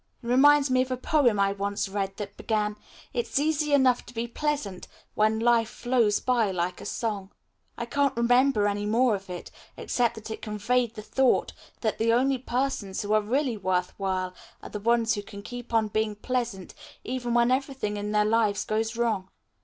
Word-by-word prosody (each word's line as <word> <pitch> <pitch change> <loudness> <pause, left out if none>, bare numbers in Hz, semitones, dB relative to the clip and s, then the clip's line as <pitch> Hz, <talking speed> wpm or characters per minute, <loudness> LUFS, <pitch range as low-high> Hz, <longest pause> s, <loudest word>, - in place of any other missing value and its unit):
It - - -8
reminds 280 +2 +5
me 255 0 +4
of 255 - -2
a 255 - -1
poem 255 -5 +2
I 200 0 +3
once 200 0 -2
read 195 0 -3
that 200 -1 -6
began, 210 -1 -1 0.4
'It's 240 0 -2
easy 300 0 +1
enough 260 -3 +4
to 245 - -13
be 230 +1 -2
pleasant 240 -7 -3 0.3
when 215 +1 +2
life 230 -1 +3
flows 240 -4 +1
by 240 -5 +1
like 180 -1 -2
a - - -6
song.' 205 -4 -3 0.5
I 235 - -3
can't 280 +1 0
remember 245 -1 +3
any 205 0 -1
more 235 +2 +3
of 195 -1 -5
it, 180 -1 -7 0.3
except 240 -2 0
that 220 0 -8
it - - -6
conveyed 230 +2 0
the 215 - -7
thought 265 +3 +2 0.3
that 220 -2 -1
the 230 +1 +3
only 260 +2 +2
persons 245 -6 -2
who 205 +1 -1
are 215 - +4
really 245 +2 0
worth 185 -2 -1
while 185 -1 -1 0.3
are - - -8
the 210 - -5
ones 230 +1 +2
who 205 - -2
can 200 0 -10
keep 245 +2 -8
on 225 -2 +2
being 215 0 -1
pleasant 230 -4 -3 0.3
even 245 -1 -2
when 240 +1 +4
everything 265 -5 -1
in 205 0 -3
their 210 0 +3
lives 215 -2 +2
goes 220 +1 -1
wrong. 220 -5 0
225 Hz, 195 wpm, -27 LUFS, 205-250 Hz, 0.5 s, reminds